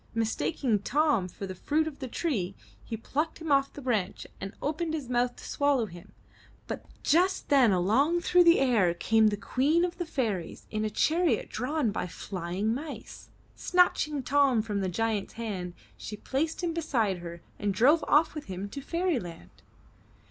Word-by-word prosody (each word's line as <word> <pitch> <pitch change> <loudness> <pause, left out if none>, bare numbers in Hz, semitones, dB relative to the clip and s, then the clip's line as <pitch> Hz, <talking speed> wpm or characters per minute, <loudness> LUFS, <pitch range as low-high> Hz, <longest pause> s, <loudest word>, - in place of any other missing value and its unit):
Mistaking 230 +1 0
Tom 280 -3 +1
for 195 - -7
the 185 - -5
fruit 305 - 0
of 300 -3 -7
the 265 - -4
tree, 235 - -2 0.3
he 225 - -5
plucked 300 +8 -2
him 325 -2 -4
off 275 0 +3
the 285 - -10
branch 210 -7 -1
and 195 - -5
opened 315 +2 -2
his 290 -5 -5
mouth 245 0 +1
to - - -11
swallow 285 -5 +2
him. 175 -4 -12 0.5
But - - -5 0.2
just 360 +5 +2
then 265 -6 +5
along 245 - +2
through 355 0 +4
the 335 0 +7
air 220 -10 +3
came 220 +4 +3
the 205 -1 0
Queen 295 - +2
of 355 0 -6
the 350 - -1
Fairies, 215 - -3
in 215 0 -1
a 215 - 0
chariot 330 - +1
drawn 270 -3 -1
by 200 - -3
flying 185 +4 -3
mice. 290 +4 -7 0.3
Snatching 305 -5 +2
Tom 270 -4 +3
from 205 -3 -2
the 190 - -1
giant's 220 +1 -1
hand, 190 -6 -5 0.2
she 210 - -7
placed 315 - -2
him 340 -1 0
beside 240 - 0
her 170 0 -8 0.2
and 205 -1 0
drove 265 - +4
off 300 +2 +4
with 305 -2 -6
him 190 +1 -5
to 280 - -7
Fairy 335 0 0
land. 170 -4 -10
250 Hz, 175 wpm, -28 LUFS, 205-305 Hz, 0.5 s, the